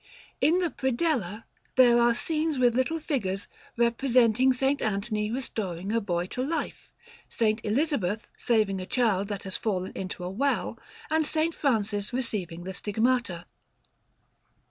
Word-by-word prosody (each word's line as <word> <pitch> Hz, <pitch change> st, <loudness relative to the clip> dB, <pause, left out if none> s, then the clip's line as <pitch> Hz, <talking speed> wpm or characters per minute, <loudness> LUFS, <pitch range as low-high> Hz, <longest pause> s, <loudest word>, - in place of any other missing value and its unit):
In 335 Hz, +3 st, +4 dB
the 350 Hz, -3 st, 0 dB
predella 245 Hz, -, -1 dB, 0.3 s
there 245 Hz, -2 st, +6 dB
are 235 Hz, 0 st, +4 dB
scenes 310 Hz, +2 st, -1 dB
with 245 Hz, -2 st, +4 dB
little 260 Hz, +6 st, +1 dB
figures, 205 Hz, -, -2 dB, 0.3 s
representing 240 Hz, +1 st, +4 dB
S. 255 Hz, +1 st, -3 dB, 0.2 s
Anthony 210 Hz, 0 st, -1 dB
restoring 205 Hz, -7 st, -3 dB
a 230 Hz, +1 st, +1 dB
boy 175 Hz, -4 st, -1 dB
to 250 Hz, +7 st, -4 dB
life; 320 Hz, +4 st, -3 dB, 0.4 s
S. 220 Hz, -1 st, +1 dB
Elizabeth 220 Hz, -, 0 dB
saving 210 Hz, -5 st, +1 dB
a 185 Hz, -, -7 dB
child 210 Hz, -6 st, +1 dB
that 205 Hz, -2 st, -4 dB
has 190 Hz, -1 st, -3 dB
fallen 190 Hz, -4 st, -2 dB
into 185 Hz, -1 st, -5 dB
a 180 Hz, -, -3 dB
well; 275 Hz, +8 st, -1 dB, 0.3 s
and 315 Hz, 0 st, +3 dB
S. 315 Hz, +2 st, 0 dB
Francis 210 Hz, -8 st, 0 dB
receiving 190 Hz, -9 st, -3 dB
the 190 Hz, +1 st, -5 dB
Stigmata. 215 Hz, -3 st, 0 dB
230 Hz, 140 wpm, -27 LUFS, 200-260 Hz, 0.4 s, there